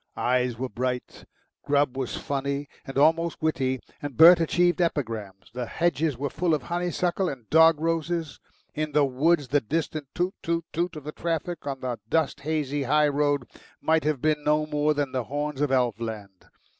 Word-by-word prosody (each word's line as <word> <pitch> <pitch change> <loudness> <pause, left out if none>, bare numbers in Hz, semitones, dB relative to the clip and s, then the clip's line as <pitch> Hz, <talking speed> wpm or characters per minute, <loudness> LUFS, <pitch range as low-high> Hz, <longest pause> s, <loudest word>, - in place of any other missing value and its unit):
Eyes 125 -1 +1
were 130 +2 -2
bright, 125 0 -4 0.4
Grubb 145 -2 +1
was 130 -2 -3
funny 140 +1 -3 0.2
and 135 - -6
almost 165 +3 +3
witty, 130 -5 0 0.2
and 145 -4 -6
Bert 170 +2 +9
achieved 175 +2 +2
epigrams; 110 - -3
the 125 -1 -4
hedges 160 -4 0
were 140 0 -3
full 165 -1 +1
of 145 - -5
honeysuckle 175 +2 -1
and 125 -6 -8
dog 160 -1 +6
roses; 165 -1 -2 0.3
in 155 -1 -3
the 150 -1 +4
woods 140 +2 +1
the 145 +1 +3
distant 155 +3 -3
toot 180 +2 0
toot 165 0 -1
toot 170 +1 -1
of 155 - -8
the 150 - -5
traffic 165 0 -3
on 135 -2 -4
the 125 -3 -3
dust 155 -3 +1
hazy 145 -1 -2
high 150 +3 +3
road 145 -2 0 0.3
might 160 0 +2
have 150 -4 -1
been 155 -1 +1
no 150 +1 +2
more 150 0 +1
than 145 -2 -1
the 130 -3 -2
horns 145 +2 -3
of 145 -2 +1
elf 125 -4 +1
land. 105 -5 -7
145 Hz, 180 wpm, -26 LUFS, 130-160 Hz, 0.4 s, Bert